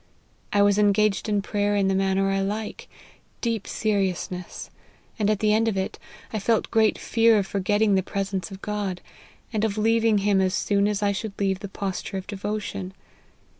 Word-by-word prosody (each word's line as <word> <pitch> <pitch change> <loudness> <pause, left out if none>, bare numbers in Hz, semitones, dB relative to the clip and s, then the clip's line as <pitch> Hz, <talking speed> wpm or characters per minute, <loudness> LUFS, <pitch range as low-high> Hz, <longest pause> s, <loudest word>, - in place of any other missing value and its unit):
I 205 -1 +4
was 205 0 +4
engaged 210 +1 +2
in 205 -1 +1
prayer 205 0 0
in 200 -1 +2
the 195 - +2
manner 195 0 +1
I 195 - +1
like, 210 +2 -4 0.5
deep 230 -3 -2
seriousness; 190 -4 -2 0.5
at 210 0 +2
the 210 +1 +2
end 225 +1 +2
of 215 -4 0
it, 190 - -3 0.3
I 215 - 0
felt 225 +2 +1
great 220 -1 +3
fear 225 -1 +3
of 200 - +1
forgetting 205 +2 +1
the 190 - +3
presence 195 -2 -3
of 195 0 -10
God, 205 -4 -2 0.5
and 215 -1 0
of 220 -1 0
leaving 225 0 +3
him 200 -1 +2
as 185 +1 +1
soon 200 0 +2
as 210 0 -1
I 200 - +3
should 200 0 -5
leave 195 -2 0
the 200 - -6
posture 195 0 -4
of 190 - -5
devotion. 200 -2 -4
205 Hz, 180 wpm, -25 LUFS, 195-215 Hz, 0.5 s, I